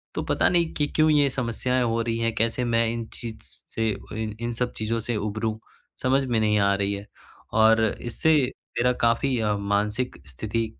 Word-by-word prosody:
तो - - -1
पता - - +2
नहीं 170 -2 +2
कि 150 - 0
क्यों 155 0 +4
ये 145 -2 +4
समस्याएँ 125 0 0
हो 115 -1 +1
रही 115 0 -1
हैं, 115 0 0
कैसे 115 +3 0
मैं 115 -1 +2
इन 115 -1 -4
चीज़ 115 -2 -5 0.4
से 110 -1 +1 0.2
ओइन 110 -1 -4
इन 120 - -1
सब 125 +1 -1
चीज़ों 115 +1 -1
से 115 +1 -2
उबरूँ 110 +1 -2 0.5
समझ 135 +1 +3
में 120 -3 +1
नहीं 105 -1 +2
आ 100 0 +3
रही 100 0 0
है। 100 0 -6 0.5
और 110 0 +5
इससे 120 +8 0 0.5
मेरा 125 +1 +3
काफ़ी 115 +3 +2
अ, 105 -2 +1
मानसिक 105 +5 -1
स्थिति 110 - -2
115 Hz, 190 wpm, -25 LUFS, 110-125 Hz, 0.5 s, और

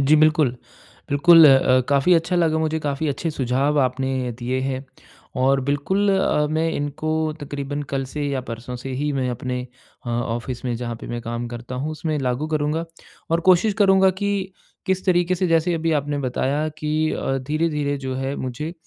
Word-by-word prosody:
जी, 140 +3 +5
बिल्कुल। 155 -4 +3 0.5
बिल्कुल, 165 +3 +7
अ - - +8 0.3
अ, - - +3
काफ़ी 140 +5 +4
अच्छा 170 +2 +1
लगा 160 -2 +2
मुझे 160 0 0
काफ़ी 145 +1 -2
अच्छे 155 +4 -2
सुझाव 140 +1 0
आपने 130 -1 -1
दिए 130 +1 -2
हैं, 130 0 -3 0.5
और 135 +1 +3
बिल्कुल 150 +9 0
अ, 150 -5 +2
मैं 160 +1 +1
इनको 145 +2 -3 0.3
तकरीबन 145 0 -4
कल 135 -1 0
से 150 - -3
या 135 -2 -1
परसों 120 +2 -6
से 135 - -5
ही 150 0 0
मैं 130 -2 -1
अपने 125 +1 -3 0.5
अ, 120 - -2
ऑफिस 120 +1 -3
में 125 -2 -1
जहाँ 120 0 -4
पे - - -8
मैं 120 0 -4
काम 120 +1 -4
करता 120 +1 -7
हूँ 155 - -2
उसमें 155 -1 -2
लागू 130 +2 -1
करूँगा, 150 +2 0 0.5
और 165 +1 +2
कोशिश 195 +3 +4
करूँगा 190 -2 +5
कि 200 -2 -1 0.3
किस 190 0 0
तरीके 175 -1 +3
से 185 +1 0
जैसे 165 +1 +2
अभी 165 0 0
आपने 145 +1 -3
बताया 140 +3 -1
कि 155 +1 0
अ, 135 0 -1
धीरे-धीरे 150 +1 -1
जो 130 -1 -4
है 135 +1 -2
मुझे 130 +6 -4
145 Hz, 185 wpm, -22 LUFS, 130-160 Hz, 0.5 s, अ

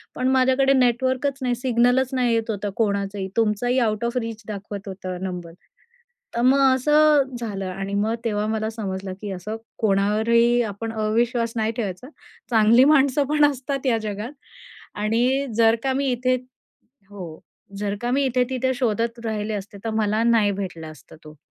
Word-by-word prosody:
पण 255 - -1
माझ्याकडे 265 +1 +3
नेटवर्कच 260 +2 +1
नाही, 250 -1 0
सिग्नलच 245 +1 +2
नाही 250 -2 +1
येत 225 0 0
होतं 205 -1 -3
कोणाचंही, 200 -2 -1
तुमचाही 230 +3 +1
आउट 220 -1 0
ऑफ 235 +2 -2
रीच 225 -2 -4
दाखवत 205 0 -7
होतं 185 -1 -6
नंबर." 180 -3 -5 0.8
तर 235 - 0
मग 260 +3 +4 0.2
असं 295 -1 +3
झालं 205 -5 -4
आणि 195 +2 -5
मग 215 +3 0
तेव्हा 210 -2 0
मला 220 0 -1
समजलं 195 -4 -5
की 205 -2 -5
असं 195 +4 -5 0.2
कोणावरही 220 +4 +3
आपण 225 0 -4
अविश्वास 230 +2 0
नाही 220 -1 0
ठेवायचा. 210 +2 -4 0.4
चांगली 225 +2 +6
माणसं 280 -1 +4
पण 300 0 +4
असतात 275 +1 -5
या 240 -3 +3
जगात 215 +4 -5 0.6
आणि 240 +6 +1
जर 225 0 +5
का 265 -1 +1
मी 275 +1 0
इथे 255 +1 +1 0.7
हो. 180 -6 -9 0.4
जर 205 0 -2
का 240 - -1
मी 275 +2 +2
इथे-तिथे 260 0 0
शोधत 230 -1 -1
राहिले 215 -1 -2
असते, 200 0 -6
तर - - 0
मला 215 0 +1
नाही 225 -3 +3
भेटला 185 -5 -5
असता 155 -5 -14
तो. 155 0 -13
225 Hz, 160 wpm, -23 LUFS, 205-255 Hz, 0.8 s, चांगली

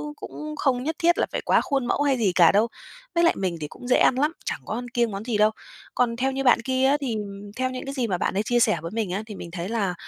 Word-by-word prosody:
cũng 305 +1 -7
không 255 -4 0
nhất 320 +2 -2
thiết 345 +1 +3
là - - +2
phải - - -2
quá - - +4
khuôn 275 -3 -1
mẫu 260 - 0
hay 275 -2 +2
gì 210 -6 +2
cả 170 -3 +7
đâu. 210 +3 +3 0.5
Với 340 - +3
lại 335 - +5
mình 185 -3 -2
thì 150 - -3
cũng 245 - -11
dễ 250 - +4
ăn 255 - +4
lắm, 295 +4 +2
chẳng - - -2
có - - -4
ăn 245 +2 -4
kiêng 235 -1 0
món 200 +1 -5
gì 235 -4 0
đâu. 215 +1 +4 0.4
Còn 235 -2 +1
theo 265 +2 0
như 270 +1 -2
bạn 245 -2 +5
kia 260 +2 +1
á 280 +2 +4
thì, 245 -5 -2
ừm, 205 -1 -7
theo 255 0 0
những 255 0 -6
cái 275 - -5
gì 255 -4 -1
mà 185 -4 -1
bạn - - -1
ấy 200 +2 0
chia 240 +2 +1
sẻ 220 -2 +3
với 165 - -6
mình 215 -3 -2
á 200 +4 -2
thì 215 -2 -8
mình 170 - -8
thấy 175 +1 -5
là, 205 -6 0
235 Hz, 310 wpm, -24 LUFS, 205-265 Hz, 0.5 s, cả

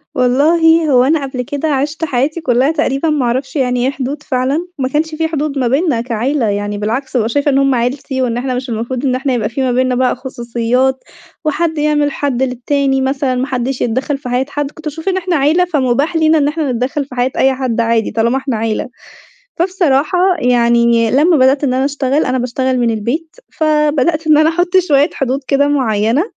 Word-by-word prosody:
والله، 320 +6 +3
هو 250 -1 +5
أنا 295 +1 +1
قبل 255 -1 -4
كده 285 +5 -3
عِشت 295 +3 -1
حياتي 285 +4 -1
كلها 260 +1 +2
تقريبًا، 300 0 0
ما 295 -4 0
أعرفش 255 +5 -2
يعني 250 -2 0
إيه 265 - +1
حدود 275 +2 -5
فعلًا. 270 +6 -1
ما 260 -2 -1
كانش 310 +2 -1
في 320 +1 0
حدود 300 -2 -3
ما 255 -2 +1
بيننا 270 -1 +1
كعِيلة 245 +3 -1
يعني، 205 0 -2
بالعكس، 225 +6 -3
بابقى 230 -3 +1
شايفة 285 +4 +1
إن 270 - +2
هم 275 -1 +2
عِيلتي، 260 +2 -2
وإن 240 -2 -1
إحنا 255 +1 -2
مش 255 +1 -4
المفروض 240 +4 -3
إن 255 -2 +1
إحنا 260 +1 -1
يبقى 220 -4 -1
في 240 +4 -4
ما 260 -1 +1
بيننا 255 +1 +1
بقى 250 0 +1
خصوصيات، 250 +1 -1 0.4
وحد 320 +1 -1
يعمل 295 -1 +1
حَد 270 -3 -1
للتاني، 270 +2 0
مثلًا، 265 -1 -1
ما 255 +2 -1
حدش 255 -1 -3
يتدخل 260 +4 -1
في 255 - -8
حياة 250 +2 0
حد. 290 0 -3
كنت 315 +1 -15
باشوف 320 +4 -6
إن 375 - 0
إحنا 360 -1 -1
عِيلة، 305 +6 +2
فمباح 285 -1 0
لينا 320 0 +3
إن 285 -2 +2
إحنا 300 -2 -1
نتدخل 260 +4 -2
في 260 - -12
حياة 250 +1 0
أي 265 0 +3
حد 255 -3 -1
عادي، 230 -1 0
طالما 230 +3 +1
إحنا 265 -3 -2
عِيلة. 220 0 -2 0.7
فبصراحة 345 -3 +1 0.2
يعني، 235 -2 +3
لما 310 +7 +3
بدأت 270 +2 +3
إن 255 -2 +1
أنا 260 +1 +1
أشتغل، 280 0 0
أنا 255 0 -1
باشتغل 255 +1 -1
من 240 -1 +1
البيت، 245 +10 -3 0.2
فبدأت 310 0 +1
إن 305 -1 +5
أنا 310 - +4
أحط 350 +2 0
شوية 285 +2 +3
حدود 270 0 -1
كده 285 0 +2
معينة، 235 -2 +1
270 Hz, 205 wpm, -15 LUFS, 250-300 Hz, 0.7 s, هو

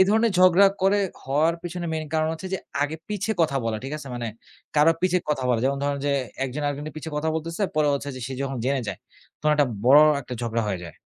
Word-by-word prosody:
এ - - +10
ধরনের 220 +1 +3
ঝগড়া 185 +2 +7 0.2
করে, 200 +2 +4 0.2
হওয়ার 150 +5 +2
পেছনে 175 0 -4
মেইন 160 -1 -2
কারণ 155 0 +2
হচ্ছে 185 +4 -7
যে - - -2 0.2
আগে 145 +2 -2
পিছে 210 +1 -2
কথা 150 -4 +1
বলা। 115 -1 -1
ঠিক 135 - -5
আছে? 140 -2 -9
মানে 120 -1 -3 0.5
কারো 150 +2 +6
পিছে 180 0 +3
কথা 135 -3 -1
বলা 120 -2 +2
যেমন 140 +1 +1
ধরেন 145 0 0
যে 145 - +2 0.3
১ 135 - -3
জন 150 - -3
আরেক 145 -1 -1
জনের 150 +1 -7
পিছে 155 +1 -6
কথা 155 +2 -1
বলতেছে 165 +5 -4
পরে 150 -1 +3
হচ্ছে 140 0 -4 0.2
সে - - -5
যখন 135 -1 -3
জেনে 135 0 +1
যায় - - -4 0.4
তখন 150 0 +3
একটা 145 -3 +3 0.2
বড় 140 +4 +8 0.2
একটা 125 - -6
ঝগড়া 115 0 -1
হয়ে 95 -3 -2
যায়। 85 - -11
150 Hz, 240 wpm, -24 LUFS, 135-170 Hz, 0.5 s, এ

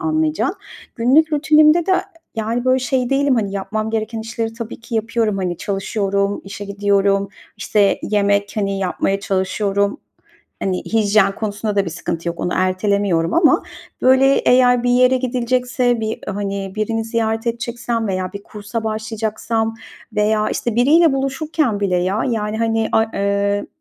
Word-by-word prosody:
anlayacağın. 315 -2 0 0.4
Günlük 285 +7 +3
rutinimde 305 +3 +4
de, 380 - +3 0.4
yani, 225 +2 -2
böyle, 255 0 +3
şey 255 -1 -1
değilim, 275 -1 +2
hani, 205 -4 -1
yapmam 215 +3 -3
gereken 220 0 -2
işleri 225 0 -4
tabii 230 0 -7
ki 235 +1 -8
yapıyorum. 225 -1 0
Hani, 180 -3 -2
çalışıyorum, 200 0 -1
işe 205 +1 -7
gidiyorum, 200 0 +1 0.3
işte, 205 -2 +2
yemek, 200 -1 +1
hani, 195 -1 -1
yapmaya 195 +1 -1
çalışıyorum, 200 +4 -1 0.6
hani, 185 -2 -2
hijyen 205 -3 +2
konusunda 210 -1 -3
da 200 - +3
bir 170 - -4
sıkıntı 165 +1 -4
yok. 170 - -5
Onu 175 - -1
ertelemiyorum 185 -2 +1
ama, 335 -1 +4 0.4
böyle, 260 +1 +5
eğer 250 -1 +4
bir 245 - +1
yere 255 +1 +4
gidilecekse, 250 -1 0
bir, 220 0 -3
hani, 200 -1 -4
birini 225 +1 -1
ziyaret 225 0 -1
edeceksem 235 -1 -2
veya 185 0 -2
bir 200 0 -8
kursa 210 +2 -6
başlayacaksam 220 +1 -2 0.4
veya, 215 0 +1
işte, 235 -2 -2
biriyle 305 +5 +5
buluşurken 270 -4 -1
bile 185 -3 +1
ya, 185 +4 0
yani, 220 -2 -2
hani, 225 -1 0
ay 225 0 +3
eee, 200 0 0
220 Hz, 145 wpm, -19 LUFS, 200-245 Hz, 0.6 s, böyle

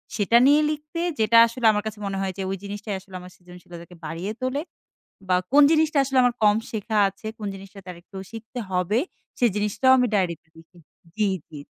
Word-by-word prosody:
সেটা 215 +2 +3
নিয়ে 295 +2 +5
লিখতে, 305 +2 -6 0.2
যেটা 220 +1 +4
আসলে 235 +1 -5
আমার 210 -1 -1
কাছে 215 -1 -7
মনে 195 -1 -3
হয় 190 -1 -2
যে, - - -4
ওই 195 - -3
জিনিসটাই 205 +1 -5
আসলে 190 0 -14
আমার 180 0 -12
সৃজনশীলতাকে 175 -1 -13
বাড়িয়ে 165 +6 -4
তোলে, 255 +3 -1 0.7
বা 180 - +3 0.2
কোন 290 +1 +7
জিনিসটা 315 -2 +2
আসলে 270 0 0
আমার 245 -1 +2
কম 210 -1 +5
শেখা 220 0 -2
আছে? 195 +3 -12
কোন 210 - -6
জিনিসটা 195 +1 -12
তার 180 -1 -8
একটু 195 - -15
শিখতে 225 +2 -9
হবে? 180 +4 0 0.4
সে 245 - +4
জিনিসটাও 210 +5 +2
আমি 250 - +3
ডায়রিতে 180 -6 -1
লিখি 165 +2 -18 0.4
জি, 215 -1 +2 0.2
জি। 155 - -10
205 Hz, 195 wpm, -24 LUFS, 185-240 Hz, 0.7 s, কোন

